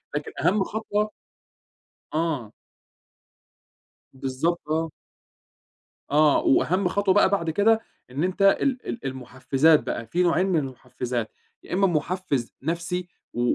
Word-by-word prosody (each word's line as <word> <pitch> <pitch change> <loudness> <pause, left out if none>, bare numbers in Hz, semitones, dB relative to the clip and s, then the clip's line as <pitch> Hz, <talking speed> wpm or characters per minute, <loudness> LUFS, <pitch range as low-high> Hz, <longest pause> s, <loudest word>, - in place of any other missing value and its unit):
لكن 145 - -3
أهم 195 +1 +3
خطوة 215 0 -2 1.0
آه. 155 -9 -1 1.6
بالضبط، 135 +6 -1
آه. 160 0 0 1.2
آه، 150 0 +5
وأهم 185 +7 +3
خطوة 195 0 +2
بقى 205 - +5
بعد 170 -5 0
كده 220 +6 +3 0.3
إن 145 +6 -2
أنت 185 +2 -2
ال 250 +6 +3
ال 235 - -5
المحفزات 130 +4 +2
بقى، 115 - -3
في 180 +8 +1
نوعين 180 +2 +3
من 175 -4 +2
المحفزات، 125 -3 -4 0.3
يا - - -8
إما 195 +1 +4
محفز 160 -5 -1
نفسي 175 +3 -2 0.3
و 120 - -2
165 Hz, 120 wpm, -25 LUFS, 135-190 Hz, 1.6 s, آه